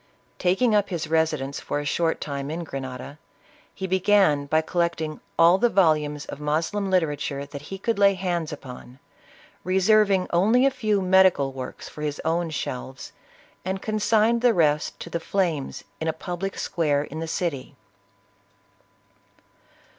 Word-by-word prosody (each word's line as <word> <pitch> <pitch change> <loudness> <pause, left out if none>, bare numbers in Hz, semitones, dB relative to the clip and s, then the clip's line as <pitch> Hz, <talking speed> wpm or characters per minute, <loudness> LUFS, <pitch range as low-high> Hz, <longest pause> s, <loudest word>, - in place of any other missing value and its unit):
Taking 195 +6 +2
up 205 -1 +2
his 170 -5 -3
residence 155 -4 0
for - - -3
a 145 - -5
short 165 +3 0
time 140 -1 -4
in 165 +3 -4
Grenada, 135 0 -7 0.5
he 190 - -6
began 185 -6 +3
by 155 +2 +2
collecting 160 -2 -2 0.2
all 170 +3 +6
the 240 - +3
volumes 155 -7 +2
of - - -8
Moslem 165 +7 -1
literature 145 -6 0
that 140 0 -9
he 195 +6 -7
could 225 +2 -1
lay 200 -1 +5
hands 175 -4 -2
upon, 130 -3 -10 0.7
reserving 190 0 +3
only 220 +9 +4
a 275 - +4
few 210 -5 0
medical 185 -7 +4
works 130 -1 -7
for 150 - -10
his 150 -1 -3
own 165 +1 0
shelves, 130 -3 -5 0.5
and 190 +1 -3
consigned 220 +2 +2
the 240 -3 +4
rest 150 -3 +1
to 170 - -8
the 170 - -1
flames 165 -6 -2 0.2
in 160 - -3
a 160 - +1
public 180 +4 -5
square 145 -4 0
in 155 +1 -7
the 165 - -4
city. 145 -5 -3
165 Hz, 150 wpm, -24 LUFS, 145-190 Hz, 0.7 s, all